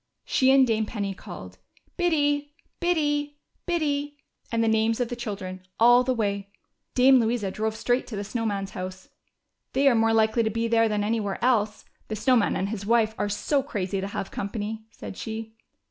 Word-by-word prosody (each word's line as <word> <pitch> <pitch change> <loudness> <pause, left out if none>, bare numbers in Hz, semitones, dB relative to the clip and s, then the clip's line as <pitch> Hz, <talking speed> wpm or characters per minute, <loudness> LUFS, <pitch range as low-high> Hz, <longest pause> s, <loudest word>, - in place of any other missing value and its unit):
She 260 - +3
and 265 0 +6
Dame 220 -2 0
Penny 200 -3 -3
called 95 - -10 0.4
"Biddy, 290 -4 +1 0.2
Biddy, 295 -4 0 0.3
Biddy," 290 -4 -1 0.3
and 230 -1 +1
the - - +2
names 220 +1 +2
of 245 -2 0
the 245 - -3
children, 200 -6 -5 0.2
all 245 +2 +7
the 255 - 0
way. 200 -3 -1 0.5
Dame 260 +1 +6
Louisa 225 -4 0
drove 220 +1 -2
straight 245 +3 0
to 225 - -6
the 200 - -3
Snow 225 +3 -3
Man's 200 -3 -2
house. 185 -1 -7 0.3
" - - -53
They 275 +1 +3
are 270 - +6
more 225 -1 +3
likely 220 +1 +3
to 220 - +1
be 230 +1 -1
there 225 -1 +3
than 210 -1 0
anywhere 210 -2 -1
else, 215 -4 +1 0.2
the 215 - -3
Snow 255 +5 +3
Man 225 -4 +2
and 195 - -1
his 210 -2 -4
wife 220 0 +2
are 205 - 0
so 275 +7 +1
crazy 195 -7 -3
to 195 - -3
have 195 -1 -5
company," 215 +2 -4
said 200 - -9
she. 220 0 -6
225 Hz, 190 wpm, -26 LUFS, 205-255 Hz, 0.5 s, all